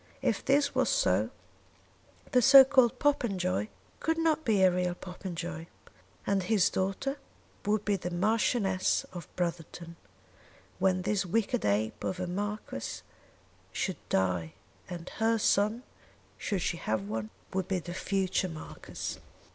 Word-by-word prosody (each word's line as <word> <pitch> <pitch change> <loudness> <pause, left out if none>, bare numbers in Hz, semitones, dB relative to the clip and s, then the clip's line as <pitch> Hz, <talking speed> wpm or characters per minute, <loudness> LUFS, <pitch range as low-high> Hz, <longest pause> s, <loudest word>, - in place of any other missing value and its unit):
If - - +1
this 280 +1 +3
was - - +2
so, - - +2 1.0
the 250 -3 +5
so 270 +2 +10
called 260 -4 +4
Popenjoy 190 - +1 0.3
could 325 0 0
not 320 -1 +2
be 210 -7 +3
a 185 - +6
real 180 0 0
Popenjoy, 175 -3 -6 0.6
and 200 -1 +1
his 190 0 +2
daughter 195 +9 -2 0.5
would 210 0 +1
be 205 -2 +1
Marchioness 195 +1 +1
of 175 -3 -7
Brotherton 170 -1 -4 0.8
when 185 -1 +2
this 200 0 +1
wicked 220 +6 0
ape 105 +2 0
of 185 - -2
a 185 - -1
marquis 205 - -4 0.7
should - - -2
die; 90 -4 0 0.4
and 175 -1 -7
her 225 +1 +2
son, 215 +3 +2 0.5
should 195 -5 -2
she 170 - -1
have 110 -8 -2
one, 110 0 -3 0.2
would 190 -1 -1
be 190 - 0
the 175 0 -6
future 190 0 0
marquis. 160 -1 -7
190 Hz, 130 wpm, -30 LUFS, 175-225 Hz, 1.0 s, so